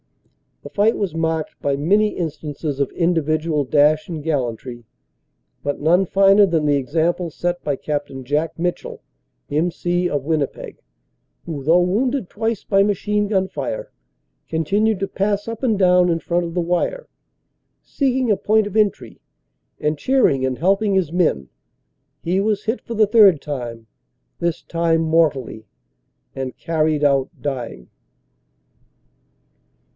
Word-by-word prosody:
;< - - -47
The - - -8
fight 210 +3 +2
was 195 -6 -2
marked 160 -1 -2
by 140 -1 0
many 200 +9 +2
instances 155 -4 -4
of 140 - 0
individual 160 -3 0
dash 150 +3 +3
and 160 -4 -6
gallantry, 125 -5 -3 0.8
but 145 0 -2
none 175 +6 +3
finer 195 +2 +5
than 165 -4 0
the 145 -1 +3
example 165 +5 0
set 175 +3 -3
by 145 - -1
Capt. 145 +1 -4
Jack 150 +5 -1
Mitchell, 175 +1 -3 0.5
M.C., 175 +3 0
of 145 -4 -2
Winnipeg, 150 -2 -3 0.6
who 145 -4 -5
though 165 +5 +4
wounded 225 +5 0
twice 225 0 -2
by 195 -1 +2
machine 205 +1 0
gun 190 -2 +1
fire, - - -5 0.6
continued 200 +7 0
to 195 - -1
pass 205 +2 -1
up 230 -1 -5
and 230 -6 +1
down 180 -2 +4
in 165 -1 +1
front 175 +1 -1
of 170 - -6
the 175 - +1
wire, 180 - -1 0.8
seeking 260 -4 0
a 205 - +2
point 215 0 +2
of 205 - -8
entry, 210 -3 0 0.6
and 150 0 -1
cheer 265 - +3
ing 135 -2 0
and 130 -1 -2
helping 195 +4 +2
his 180 -5 +1
men. 155 - 0 0.7
He 180 +3 0
was 210 0 0
hit 225 +3 -1
for 235 - -7
the 215 -1 +4
third 205 -7 +6
time, 120 -6 -6 0.5
this 170 -1 -1
time 165 -1 +1
mortally, 155 -9 0 0.7
and 130 -1 -5
carried 155 -2 0
out 140 -2 +2
dying. 125 - -5
170 Hz, 145 wpm, -20 LUFS, 150-200 Hz, 0.8 s, third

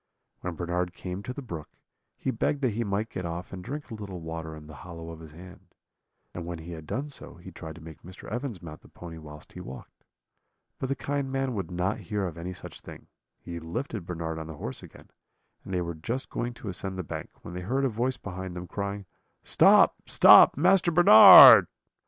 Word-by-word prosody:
When 90 -2 -5
Bernard 90 +1 -3
came 90 +1 -6
to 100 - -7
the 140 +2 -8
brook, 85 -10 -8 0.5
he - - -2
begged 145 -1 -2
that 125 - +2
he 115 +3 -2
might 105 +1 -3
get 90 - -5
off 85 +2 -6
and 90 -1 -8
drink 145 +4 -7
a - - -5
little 100 -4 -7
water 80 -1 -7
in 75 -1 -12
the 75 -1 -12
hollow 85 -2 -9
of 80 - -10
his 80 -2 -12
hand; 90 +3 -15 0.6
and 85 - -6
when 85 0 -6
he 80 +2 -10
had 80 -2 -9
done 145 +3 -4
so, 140 - -9
he 90 +2 -12
tried 80 -2 -9
to 85 - -13
make 80 -1 -12
Mr. 90 +2 -13
Evans 120 -5 -5
mount 80 -2 -10
the - - -18
pony 85 -2 -11
whilst 75 -1 -13
he - - -10
walked. 65 +2 -12 0.8
But 130 - -4
the 135 - 0
kind 140 -1 -3
man 135 -1 -2
would 100 -4 -4
not 90 +3 -2
hear 105 -2 -3
of 85 -4 -5
any 85 +2 -6
such 90 - -10
thing; - - -13 0.3
he 85 -1 -8
lifted 85 - -6
Bernard 80 -2 -5
on 80 - -7
the 80 - -8
horse 65 - -6
again, - - -16 0.5
and - - -10
they 90 -1 -1
were 85 0 -4
just 115 - -5
going 120 0 -4
to 110 - -8
ascend 95 +1 -5
the 95 - -4
bank, - - -7
when 85 - -9
they 90 - -6
heard 130 +9 -1
a - - +1
voice 125 +3 -2
behind 95 -1 -7
them, 90 0 -6
crying: 100 +2 -5 0.4
'Stop, - - +5
stop, - - +7
Master 180 +3 +3
Bernard.' 160 -10 +10
90 Hz, 220 wpm, -27 LUFS, 85-115 Hz, 0.8 s, Bernard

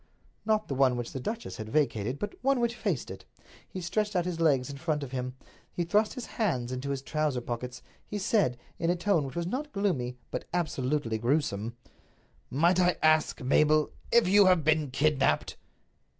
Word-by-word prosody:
Not 215 -1 +2
the - - -3
one 130 -2 +3
which 120 -1 -4
the 135 - -5
duchess 225 - -5
had 110 0 -6
vacated, 125 -3 0
but 205 +6 -4
one 270 0 +2
which 235 -1 +1
faced 195 - -2
it. 95 - -9 0.5
He 185 - -6
stretched 210 +4 -1
out 175 -1 +2
his 175 -2 -3
legs 140 -6 +3
in 140 - -8
front 155 -1 -1
of 130 - -7
him; 125 -1 -4 0.4
he 175 - -2
thrust 210 +7 +1
his 250 - -5
hands 130 - -1
into 130 +2 -4
his 135 -1 -3
trousers 150 -5 -1
pockets; 125 +1 -5 0.2
he 210 - -4
said, 195 - +1 0.2
in 165 - 0
a 175 - +3
tone 175 -5 +1
which 130 - -9
was 170 - -1
not 275 - -3
gloomy 150 - -1
but - - -4
absolutely 140 -7 -1
grewsome: 120 -3 0 0.7
"Might 170 +7 +3
I 180 -1 +3
ask, 155 -4 +3
Mabel, 150 +3 +3 0.2
if 235 -5 +5
you 200 +1 +6
have 180 -4 +4
been 155 -1 +2
kidnaped?" 140 - +1
155 Hz, 190 wpm, -29 LUFS, 130-185 Hz, 0.7 s, you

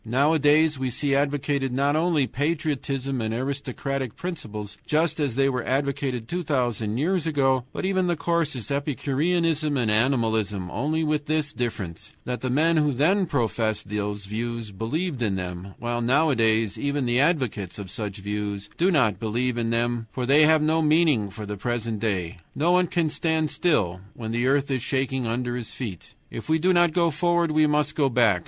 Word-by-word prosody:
Nowadays 150 +4 +3
we 130 -1 -1
see 140 +3 -1
advocated 140 -1 0
not 140 +3 +1
only 160 -3 +2
patriotism 140 -2 -2
and 110 0 -2
aristocratic 135 -1 -3
principles 110 - -6
just 155 +1 +1
as 140 -6 0
they 135 +1 +3
were 130 -2 0
advocated 135 -3 -1
two 175 +7 -2
thousand 120 - -1
years 170 +3 0
ago, 135 -5 +2
but - - -4
even 190 -1 +1
the 175 - +1
coarsest 155 -5 -1
epicureanism 150 +2 0
and 115 -4 +1
animalism, 110 -5 +1
only 155 +6 -1
with 150 -1 -1
this 155 -1 0
difference, 100 - -5
that 125 0 -3
the 130 - -2
men 160 +6 +3
who 150 -2 +2
then 180 +9 +2
professed 115 -7 -1
those 105 -1 -3
views 115 +1 -4
believed 135 - -3
in 105 -4 +1
them, 90 +1 -6
while 120 0 -2
nowadays 115 -6 +2
even 140 -1 -1
the 120 +1 +2
advocates 130 - 0
of 100 -3 -7
such 105 -2 -5
views 105 0 -4
do 180 - +3
not 120 - +2
believe 120 +3 -1
in 115 -1 -1
them, 115 0 0
for 125 - -3
they 145 +4 +6
have 155 -1 +4
no 160 +1 +2
meaning 150 -9 +3
for 105 +2 -8
the 105 0 -5
present 115 0 -2
day. 90 -6 -2 0.2
No 165 +4 +2
one 180 0 +4
can 170 -1 0
stand 160 0 0
still 100 - +1
when 110 -2 -5
the 120 +2 0
earth 140 +1 +2
is 130 -2 0
shaking 130 -1 -1
under 120 +1 -2
his 120 -3 -5
feet. 105 -9 -7 0.2
If 115 - -7
we 160 - +4
do 185 +3 +2
not 175 -1 +4
go 170 0 +2
forward 170 +2 +1
we 155 0 +4
must 150 0 +1
go 140 -3 +2
back. 115 -7 +3
135 Hz, 180 wpm, -25 LUFS, 115-155 Hz, 0.2 s, they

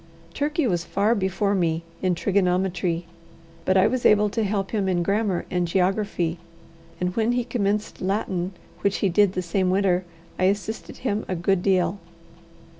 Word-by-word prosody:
Turkey 300 +1 0
was 175 -7 0
far 205 +5 +1
before 200 -1 0
me 170 -3 0 0.2
in 185 -2 +1
trigonometry, 180 -2 0 0.6
but 185 - +3
I 190 - +5
was 255 +2 0
able 210 0 +5
to 225 +1 0
help 195 -1 -1
him 205 -3 0
in 175 -2 +1
grammar 200 -1 0
and 180 -1 0
geography, 180 -2 0 0.6
and 180 +1 -1
when 230 +1 +2
he 245 0 +1
commenced 210 -3 -2
Latin, 190 -1 -1 0.3
which 200 0 +1
he - - +3
did 195 +1 +3
the 185 - -2
same 185 +2 0
winter, 185 -1 +2 0.4
I 185 - +3
assisted 205 +3 -2
him 215 -4 -1
a 185 - -2
good 175 +2 +1
deal. 185 0 +1
190 Hz, 165 wpm, -24 LUFS, 180-210 Hz, 0.6 s, I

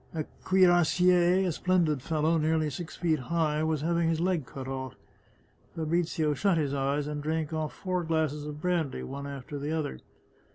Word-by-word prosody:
A 155 - -1 0.2
cuirassier, 180 0 +4
a - - +1
splendid 165 -4 +1
fellow, 160 +2 +1
nearly 155 -1 +1
six 170 +4 -6
feet 160 -4 +1
high, 155 +2 0
was 155 -2 0
having 170 +1 +1
his 165 -1 0
leg 170 -6 0
cut 135 -1 -7
off. 130 -1 -5 0.8
Fabrizio 160 -1 0
shut 190 +3 +2
his 145 -3 0
eyes 140 +1 0
and 150 0 -4
drank 160 +1 -2
off 155 -1 -2
four 185 -2 -2
glasses 155 -2 -1
of 150 0 -6
brandy 165 -5 -1
one 140 +1 -6
after 140 +1 -6
the 145 +2 -3
other. 155 - -2
155 Hz, 170 wpm, -29 LUFS, 145-170 Hz, 0.8 s, cuirassier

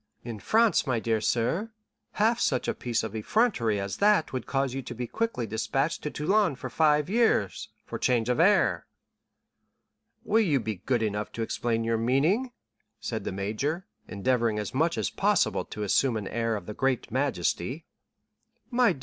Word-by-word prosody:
In 115 -3 -6
France, 220 - +3
my 125 -3 +1
dear 110 -1 0
sir, 145 - 0 0.4
half 225 +3 +2
such 130 - 0
a - - +1
piece 120 -3 -2
of 110 -1 -5
effrontery 115 - +1
as 100 0 -4
that 205 -7 +3
would 130 -3 -4
cause 135 -2 0
you 135 - -3
to 120 -1 -8
be 125 +1 -3
quickly 225 - -2
despatched 135 +8 -1
to 150 - -3
Toulon 180 +2 +1
for 130 0 -7
five 150 0 +3
years, 215 - +1 0.2
for - - -6
change 120 -3 +1
of 125 +3 +1
air." 200 +5 +3 1.4
"Will 220 +2 +3
you 150 -9 +2
be 110 -3 -4
good 120 -4 +2
enough 105 0 -2
to 115 - -2
explain 115 0 -1
your 115 0 0
meaning?" 155 - +1 0.5
said - - -4
the - - -2
major, 110 - -2 0.2
endeavoring 115 +2 0
as 105 -2 -4
much 160 0 +1
as 110 - -1
possible - - +1
to 105 - -6
assume 115 +4 +2
an 105 -3 -5
air 115 -1 -1
of 100 -4 -6
the 105 - -6
greatest 135 0 -1
majesty. 130 - -1 0.9
"My 240 -5 +4
dear - - -12
M. - - -15
125 Hz, 180 wpm, -27 LUFS, 110-165 Hz, 1.4 s, My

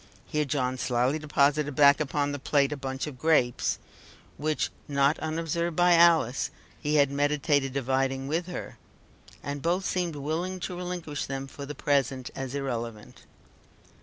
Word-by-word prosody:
Here 150 0 -1
John 130 -3 -1
slyly 125 +5 +1
deposited 145 -1 +1
back 140 +1 +6
upon 145 -1 0
the 145 - -4
plate 140 +1 +2
a - - -1
bunch 135 -1 -4
of 140 -5 -8
grapes, 140 -6 +2 0.6
which, 155 +1 -1 0.2
not 140 +1 +2
unobserved 165 +1 -2
by 175 +1 +5
Alice, 165 -7 +4 0.3
he 150 0 0
had 140 -2 +4
meditated 145 -1 +1
dividing 135 0 0
with 165 +4 -1
her, 180 - -7 0.6
and 140 +1 -4
both 180 +5 0
seemed 175 -3 -1
willing 165 +6 -3
to 180 - -4
relinquish 175 -5 -4
them 135 0 -4
for 140 +1 -9
the 150 - -6
present 135 -3 0
as 135 0 -4
irrelevant. 120 -6 -5
145 Hz, 150 wpm, -28 LUFS, 135-160 Hz, 0.6 s, back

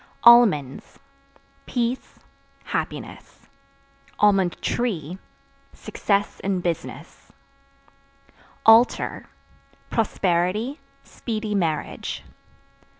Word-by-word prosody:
Almonds 210 - +5 0.7
Peace, 245 +1 -2 0.5
happiness; - - -6 1.2
(tree) 185 - -2 0.5
success 200 -1 -2
in 190 -1 -1
business. 170 -2 -5 1.3
Altar 225 +2 +4 0.6
Prosperity, 205 - 0 0.2
speedy 215 -2 -5
marriage. 165 -6 -2
205 Hz, 50 wpm, -23 LUFS, 175-235 Hz, 1.3 s, Almonds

